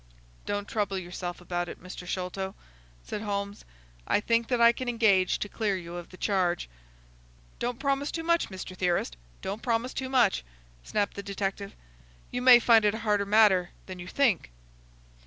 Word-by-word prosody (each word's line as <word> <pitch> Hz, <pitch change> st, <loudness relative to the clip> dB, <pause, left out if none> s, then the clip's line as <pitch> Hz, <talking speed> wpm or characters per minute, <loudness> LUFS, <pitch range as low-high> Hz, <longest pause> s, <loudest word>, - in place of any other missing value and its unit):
"Don't 205 Hz, 0 st, -2 dB
trouble 205 Hz, -3 st, -1 dB
yourself 175 Hz, -1 st, -5 dB
about 175 Hz, 0 st, -3 dB
it, -, -, -9 dB
Mr. 180 Hz, 0 st, -9 dB
Sholto," 190 Hz, +1 st, -3 dB, 0.5 s
said 210 Hz, -, -4 dB
Holmes. 200 Hz, -1 st, -4 dB, 0.4 s
"I -, -, +3 dB
think 230 Hz, +2 st, +1 dB
that 245 Hz, -2 st, 0 dB
I 235 Hz, 0 st, +8 dB
can 250 Hz, +1 st, -4 dB
engage 205 Hz, -6 st, +3 dB
to -, -, -3 dB
clear 205 Hz, -2 st, -1 dB
you 170 Hz, -1 st, -8 dB
of 175 Hz, -1 st, -7 dB
the 185 Hz, -, -13 dB
charge." 180 Hz, -3 st, 0 dB, 0.9 s
"Don't 240 Hz, 0 st, -2 dB
promise 275 Hz, +1 st, 0 dB
too 330 Hz, -, -4 dB
much, 335 Hz, 0 st, +2 dB
Mr. 185 Hz, -1 st, -7 dB
Theorist,—don't 170 Hz, -, -3 dB
promise 235 Hz, +1 st, -1 dB
too 265 Hz, -1 st, -4 dB
much!" 245 Hz, -, +3 dB, 0.4 s
snapped 205 Hz, -1 st, -1 dB
the 200 Hz, -, -6 dB
detective. 200 Hz, 0 st, -4 dB, 0.6 s
"You 245 Hz, -, -2 dB
may 250 Hz, -1 st, +9 dB
find 230 Hz, -2 st, +5 dB
it 210 Hz, 0 st, +2 dB
a 225 Hz, 0 st, -7 dB
harder 205 Hz, -2 st, +2 dB
matter 200 Hz, -4 st, +5 dB, 0.2 s
than 185 Hz, -1 st, -8 dB
you 175 Hz, -, -8 dB
think." 225 Hz, -, +1 dB
200 Hz, 170 wpm, -28 LUFS, 185-230 Hz, 0.9 s, may